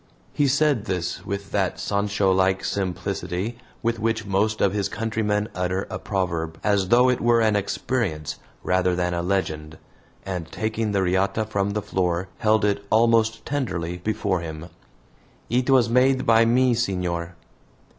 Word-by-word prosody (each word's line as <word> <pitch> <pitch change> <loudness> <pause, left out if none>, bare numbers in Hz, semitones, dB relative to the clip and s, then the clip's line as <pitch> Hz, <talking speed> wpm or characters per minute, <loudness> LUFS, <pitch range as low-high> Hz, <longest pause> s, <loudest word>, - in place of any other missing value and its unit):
He 145 - +2
said 140 -4 +2
this 90 -4 -3
with 100 0 -4
that 95 -3 0
Sancho 100 -1 +1
like 95 0 +2
simplicity 95 +3 -3 0.2
with 115 0 0
which 110 -1 -1
most 105 +2 0
of 100 - +2
his 100 -2 -1
countrymen 110 -2 -1
utter 90 +1 -1
a - - -4
proverb, 85 -5 -2
as 100 -3 +2
though 120 +4 +5
it 125 -1 +1
were 120 0 +4
an 110 -2 +3
experience 95 - -2 0.2
rather 90 0 +2
than 90 0 0
a 85 - -1
legend, 80 -5 -2 0.5
and, 90 -4 -5
taking 110 0 -2
the 100 -2 +1
riata 95 +4 +1
from 100 -1 -1
the 105 -1 -2
floor, 90 -2 -1
held 110 -1 +3
it 100 -1 0
almost 115 0 +3
tenderly 90 -12 -2
before 100 0 -1
him. 80 0 -7 0.8
"It 125 +2 +1
was 130 -3 +5
made 130 +2 +3
by 115 0 +5
me, 125 +2 +3
senor." 90 -6 -2
100 Hz, 155 wpm, -24 LUFS, 90-115 Hz, 0.8 s, though